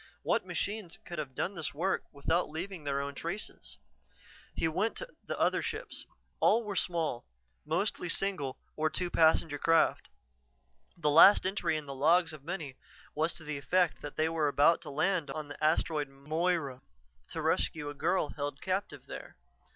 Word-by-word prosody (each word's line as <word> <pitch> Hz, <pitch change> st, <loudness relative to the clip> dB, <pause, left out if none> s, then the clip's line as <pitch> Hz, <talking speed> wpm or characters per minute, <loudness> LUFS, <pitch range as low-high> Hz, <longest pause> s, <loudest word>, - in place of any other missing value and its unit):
What -, -, +1 dB
machines 205 Hz, -4 st, -3 dB
could 175 Hz, -2 st, -5 dB
have 135 Hz, -4 st, -5 dB
done 190 Hz, -, -1 dB
this 160 Hz, -6 st, -3 dB
work 185 Hz, +5 st, 0 dB
without 160 Hz, +5 st, 0 dB
leaving 170 Hz, +1 st, -6 dB
their 140 Hz, -1 st, 0 dB
own 140 Hz, 0 st, -4 dB
traces? 165 Hz, -, -6 dB, 0.8 s
He 165 Hz, -, +1 dB
went 190 Hz, +8 st, 0 dB
to -, -, -4 dB, 0.2 s
the -, -, -3 dB
other -, -, +3 dB
ships: -, -, -5 dB, 0.3 s
all 230 Hz, +2 st, +4 dB
were 205 Hz, -2 st, -4 dB
small, 165 Hz, -10 st, -1 dB, 0.4 s
mostly 175 Hz, +2 st, 0 dB
single 165 Hz, -8 st, -1 dB, 0.2 s
or 155 Hz, 0 st, +1 dB
two 175 Hz, +2 st, -2 dB
passenger 160 Hz, -2 st, +3 dB
craft. 165 Hz, +2 st, +3 dB, 0.9 s
The 150 Hz, -3 st, +1 dB
last 185 Hz, +7 st, +8 dB
entry 190 Hz, -4 st, 0 dB
in 155 Hz, -, -6 dB
the 140 Hz, -, -6 dB
logs 160 Hz, +5 st, +3 dB
of 150 Hz, -3 st, -11 dB
many 160 Hz, -5 st, -5 dB, 0.4 s
was 160 Hz, +3 st, 0 dB
to 165 Hz, -, -8 dB
the 150 Hz, -2 st, -4 dB
effect 175 Hz, +5 st, +1 dB
that 145 Hz, -, -7 dB
they 155 Hz, -, +2 dB
were 160 Hz, -2 st, +1 dB
about 145 Hz, +4 st, +4 dB
to -, -, -8 dB
land 165 Hz, +1 st, 0 dB
on 150 Hz, +1 st, -5 dB
the 145 Hz, -, -8 dB
Asteroid 155 Hz, -2 st, +2 dB
Moira 145 Hz, -1 st, -1 dB, 0.5 s
to -, -, -4 dB
rescue 150 Hz, -2 st, +1 dB
a 145 Hz, -, -4 dB
girl 165 Hz, +2 st, +1 dB
held 145 Hz, -1 st, -4 dB
captive 190 Hz, +1 st, -3 dB
there. -, -, -9 dB
160 Hz, 170 wpm, -31 LUFS, 145-180 Hz, 0.9 s, last